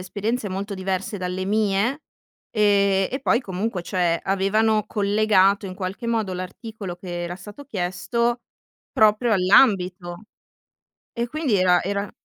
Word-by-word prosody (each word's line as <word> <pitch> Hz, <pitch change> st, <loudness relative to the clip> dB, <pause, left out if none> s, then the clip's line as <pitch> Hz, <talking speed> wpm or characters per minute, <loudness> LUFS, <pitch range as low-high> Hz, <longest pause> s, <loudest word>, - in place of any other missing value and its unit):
esperienze 210 Hz, +5 st, -3 dB
molto 195 Hz, +2 st, -4 dB
diverse 190 Hz, +2 st, -3 dB
dalle 180 Hz, +1 st, -3 dB
mie, 215 Hz, +7 st, 0 dB, 0.5 s
ehm, 200 Hz, -2 st, +3 dB
e 265 Hz, +2 st, -3 dB
poi 240 Hz, -2 st, +2 dB
comunque, 190 Hz, -2 st, -3 dB
cioè, 175 Hz, -2 st, 0 dB
avevano 210 Hz, +3 st, +2 dB
collegato 200 Hz, -1 st, +2 dB
in 185 Hz, -, -7 dB
qualche 190 Hz, +5 st, -5 dB
modo 220 Hz, -5 st, -1 dB
l'articolo 185 Hz, +1 st, -7 dB
che 175 Hz, -1 st, -6 dB
era 175 Hz, +1 st, -5 dB
stato 205 Hz, +9 st, -11 dB
chiesto 235 Hz, +3 st, -1 dB, 0.5 s
proprio 215 Hz, +2 st, +3 dB
all'ambito. 185 Hz, -2 st, +3 dB, 0.9 s
E 235 Hz, 0 st, -2 dB
quindi 290 Hz, -3 st, -1 dB
era 180 Hz, -2 st, +4 dB
era 200 Hz, +1 st, -3 dB
200 Hz, 125 wpm, -23 LUFS, 185-220 Hz, 0.9 s, era